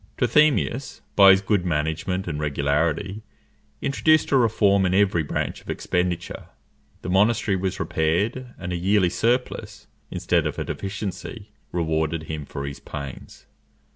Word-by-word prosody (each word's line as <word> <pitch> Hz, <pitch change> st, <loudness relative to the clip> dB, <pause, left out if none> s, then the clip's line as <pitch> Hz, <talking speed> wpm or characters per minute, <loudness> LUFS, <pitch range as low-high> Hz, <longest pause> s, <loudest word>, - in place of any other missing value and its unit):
Trithemius, 145 Hz, -3 st, +2 dB
by 100 Hz, -1 st, +8 dB
his 95 Hz, 0 st, +6 dB
good 100 Hz, -2 st, +1 dB
management 80 Hz, +3 st, -1 dB
and 75 Hz, -3 st, -3 dB
regularity, 75 Hz, +7 st, -1 dB, 0.6 s
introduced 155 Hz, +2 st, +2 dB
a -, -, +4 dB
reform 105 Hz, -5 st, +3 dB
in 90 Hz, 0 st, +1 dB
every 95 Hz, -4 st, +3 dB
branch 75 Hz, -, -3 dB
of -, -, -16 dB
expenditure. 90 Hz, -1 st, -2 dB, 0.6 s
The -, -, -4 dB
monastery 105 Hz, +1 st, +3 dB
was 95 Hz, 0 st, -2 dB
repaired, 105 Hz, +11 st, -1 dB
and 90 Hz, -1 st, -5 dB
a -, -, -1 dB
yearly 95 Hz, 0 st, +2 dB
surplus, 125 Hz, +3 st, -1 dB, 0.2 s
instead -, -, 0 dB
of -, -, -5 dB
a -, -, -3 dB
deficiency, 100 Hz, +2 st, -6 dB, 0.2 s
rewarded 80 Hz, -1 st, -1 dB
him 80 Hz, -2 st, -5 dB
for 70 Hz, -, -5 dB
his 70 Hz, 0 st, -6 dB
pains. 70 Hz, -3 st, -9 dB
95 Hz, 140 wpm, -24 LUFS, 80-105 Hz, 0.6 s, by